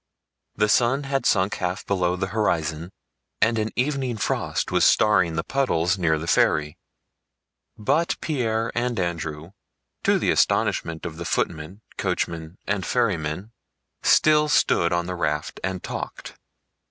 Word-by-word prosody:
The 105 0 +2
sun 120 +6 +2
had 135 0 -1
sunk 95 0 +2
half 90 +1 -3
below 90 -2 0
the 95 +1 -3
horizon 80 -5 -1 0.5
and 115 +1 +2
an 110 0 -1
evening 130 -2 -1
frost - - -1
was - - +2
starring 95 -6 +4
the 80 - -1
puddles 95 -9 0
near 80 -3 +2
the 80 - -5
ferry, 75 -2 +2 1.0
but 145 +10 0
Pierre 115 -6 -1
and 120 -2 -1
Andrew, 80 -2 -3 0.5
to - - +3
the - - +1
astonishment 80 -1 +1
of 80 -2 -6
the 85 - -5
footmen, 85 +3 -2 0.2
coachmen, 80 +1 -3
and 100 -1 -1
ferrymen, 95 -5 -1 0.5
still 150 -1 +4
stood 85 -10 +3
on 85 0 0
the 90 - -4
raft 75 -4 -2
and 95 0 -3
talked. - - -6
95 Hz, 140 wpm, -24 LUFS, 85-115 Hz, 1.0 s, starring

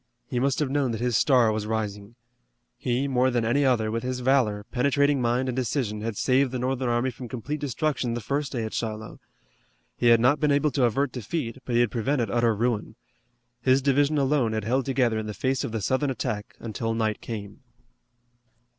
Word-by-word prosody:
He 125 - -2
must 135 0 +1
have 145 -3 -1
known 140 -2 +1
that 110 - -3
his 120 -1 0
star 125 -3 +4
was 105 -1 -3
rising. 105 0 -3 0.6
He, 125 +3 -1
more 130 -1 +2
than 120 -2 0
any 140 +6 +2
other, 115 -5 +2
with 115 +1 -2
his 125 0 -3
valor, 120 -6 +2
penetrating 140 +2 +2
mind 120 +2 +1
and 125 - -2
decision 120 -4 -1
had 110 -1 -4
saved 130 0 +2
the 130 - -2
Northern 130 0 -1
army 120 +2 +1
from 125 +1 -9
complete 130 +6 -4
destruction 140 -4 -1
the - - -2
first 140 +5 -2
day 120 -4 -2
at 110 - -5
Shiloh. 110 -1 -4 0.8
He 120 - +1
had 115 -1 +7
not 130 +6 +3
been 150 -1 +2
able 145 +1 +2
to 130 -3 +2
avert 135 +3 0
defeat, 125 +1 -4
but 120 - -2
he 120 - +5
had 120 - +1
prevented 120 -2 0
utter 120 -2 +2
ruin. 110 -1 -1 0.7
His 130 0 +4
division 145 +2 +2
alone 135 -5 +2
had 110 -1 -2
held 125 +5 0
together 125 -4 +1
in 110 - -5
the 105 - -5
face 130 -1 0
of - - -3
the 110 -1 -3
Southern 130 +7 0
attack 115 -4 -4
until 115 0 -3
night 110 -2 -1
came. 105 -2 -7
125 Hz, 205 wpm, -26 LUFS, 115-135 Hz, 0.8 s, had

